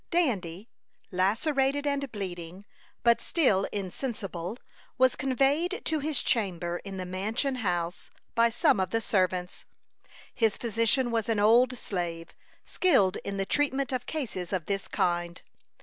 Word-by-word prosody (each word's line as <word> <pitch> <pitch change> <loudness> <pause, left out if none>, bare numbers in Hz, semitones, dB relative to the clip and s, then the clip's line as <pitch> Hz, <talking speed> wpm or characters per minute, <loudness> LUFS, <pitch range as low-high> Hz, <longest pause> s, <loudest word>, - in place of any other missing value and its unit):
Dandy, 210 - 0 0.4
lacerated 270 - +1
and 280 -2 -1
bleeding, 185 -2 -6 0.4
but 235 0 +4
still 220 - +2
insensible, 195 -1 -4 0.4
was 260 -1 +4
conveyed 275 - +1
to 315 -1 0
his 295 0 0
chamber 175 -7 0
in 195 -1 -7
the 185 - -4
mansion 215 +9 -1
house, 175 -5 -2 0.2
by 230 0 +4
some 225 -3 +2
of 185 -2 0
the 225 - +1
servants. 185 -4 -1 0.7
His 225 -4 +1
physician 235 +2 +1
was 225 -1 -1
an 220 -2 +2
old 245 +4 +4
slave, 170 -5 -4 0.4
skilled 260 - +3
in 200 0 -5
the 195 - 0
treatment 275 +2 0
of 255 -1 -3
cases 220 - -4
of 185 -5 -1
this 195 -1 -2
kind. 175 -1 -1
215 Hz, 135 wpm, -28 LUFS, 185-260 Hz, 0.7 s, but